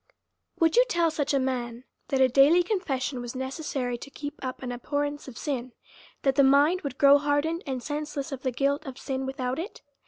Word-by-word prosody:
Would 330 +4 +3
you - - +7
tell 340 -6 +2
such 295 -2 -1
a 280 - +3
man, 250 -2 -2 0.2
that 270 - 0
a 260 - +7
daily 280 +7 +5
confession 290 - -2
was 240 +1 -6
necessary 260 -2 -3
to 280 - -9
keep 290 +1 -6
up 255 0 -5
an 250 - -3
abhorrence 290 +4 -3
of 255 - -9
sin, 255 -4 -3 0.5
that 270 - +3
the 280 - +4
mind 290 +7 +4
would 275 -3 -5
grow 280 0 +7
hardened 295 +4 0
and 260 -2 -3
senseless 295 -1 -4
of 265 -2 -5
the 260 - 0
guilt 280 +3 0
of 265 -1 -7
sin 265 -1 -3
without 260 0 -3
it? 385 +8 -7
275 Hz, 205 wpm, -27 LUFS, 260-295 Hz, 0.5 s, you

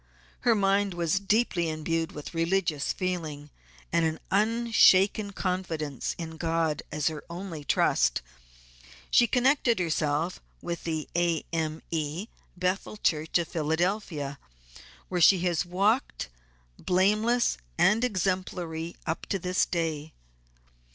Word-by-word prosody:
Her 240 -2 +3
mind 200 -1 +2
was 170 +2 +1
deeply 200 -4 +1
imbued 160 +1 -2
with 150 +3 -8
religious 165 -3 0
feeling, 160 -6 -4 0.4
and 165 - +3
an 160 0 0
unshaken 210 -2 +4
confidence 170 -8 -3
in 160 -1 -6
God 165 -2 0
as 150 -1 -2
her 155 -2 -1
only 170 -3 -6
trust; 105 - +2 0.9
she 240 - +6
connected 255 -1 +3
herself 160 -1 -1 0.2
with 170 -1 -5
the 160 -2 -2
A.M.E. 165 +1 -2 0.3
Bethel 185 +4 -1
Church, 160 -5 +1
of 170 -2 -1
Philadelphia, 160 -3 -1 0.7
where 180 -1 -1
she 180 +2 +6
has 175 -1 0
walked, 200 - 0 0.5
blameless 210 - +2 0.2
and 215 +5 +4
exemplary 180 -6 -2
up 160 - -3
to 195 - 0
this 185 0 0
day. 160 -3 -2
175 Hz, 110 wpm, -28 LUFS, 160-195 Hz, 0.9 s, she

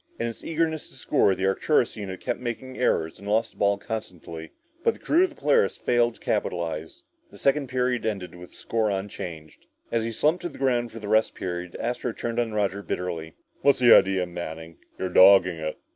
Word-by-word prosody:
In 115 - -2
its 115 -1 -6
eagerness 160 -1 -1
to - - -17
score, 95 - +2
the 95 - -2
Arcturus 120 +6 +2
unit 95 -4 -6
kept 120 - -2
making 125 +2 -5
errors 80 -10 0
and 100 - -10
lost 110 +2 +1
the - - -27
ball 100 0 +2
constantly 90 -7 -7 0.3
but 460 - +2
the - - -16
crew 340 +4 +3
of - - -5
the - - -16
Polaris 470 -2 +2
failed 120 -1 +1
to - - -21
capitalize. 80 -2 -3 0.3
The - - -15
second 140 0 +1
period 125 -1 0
ended 100 -5 -3
with 90 0 -11
the - - -22
score 110 -2 0
unchanged. 90 -5 -6 0.2
As 115 -1 +1
he 115 - -2
slumped 155 +9 +1
to 175 - -3
the - - -13
ground 120 -3 0
for 115 - -10
the 105 -2 -7
rest 110 +1 +2
period, 90 -1 -5
Astro 120 0 -2
turned 115 +2 -3
on 115 -2 0
Roger 100 -2 -1
bitterly. 85 -5 -4 0.3
"What's 140 - +4
the 120 -2 +7
idea, 95 -1 +5
Manning? 80 -2 -7 0.2
You're 95 - -2
dogging 95 -1 +6
it!" 80 -1 -4
105 Hz, 205 wpm, -25 LUFS, 90-120 Hz, 0.3 s, the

